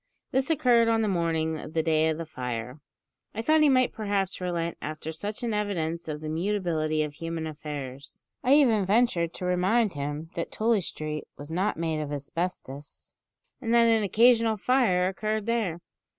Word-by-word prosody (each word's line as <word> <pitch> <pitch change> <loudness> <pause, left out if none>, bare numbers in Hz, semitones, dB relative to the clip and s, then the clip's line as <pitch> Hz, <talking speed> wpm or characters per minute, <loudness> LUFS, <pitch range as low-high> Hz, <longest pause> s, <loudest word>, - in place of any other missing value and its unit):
This 265 +2 +1
occurred 245 -7 +4
on 225 -1 +2
the - - +1
morning 165 -4 0
of 155 - -9
the 160 - +2
day 160 0 +2
of 160 - -1
the 165 - -5
fire. 125 -2 -5 0.6
I 225 - -3
thought 310 +4 +4
he 300 - +6
might 255 -2 +3
perhaps 200 -4 -2
relent 170 -2 -2
after 155 +1 -5
such 205 +9 -5
an 230 -2 -1
evidence 170 -6 -2
of 150 -1 -4
the 155 - -5
mutability 160 -3 0
of 150 -1 -5
human 165 +1 -4
affairs. 145 -3 -7 0.2
I 260 +3 +5
even 235 -9 +4
ventured 190 -5 +2
to 180 - -5
remind 185 +4 +2
him 145 +3 -5
that 170 - -4
Tooley 220 -1 +2
Street 155 -3 -5
was 145 +2 -8
not 185 +5 0
made 160 -1 -1
of 145 -1 -5
asbestos, 145 -1 -5 0.5
and 230 -3 -2
that 235 0 +6
an 225 -1 +4
occasional 225 +2 +4
fire 205 -6 +2
occurred 215 +2 -2
there! 220 -8 -1
180 Hz, 180 wpm, -27 LUFS, 155-220 Hz, 0.6 s, he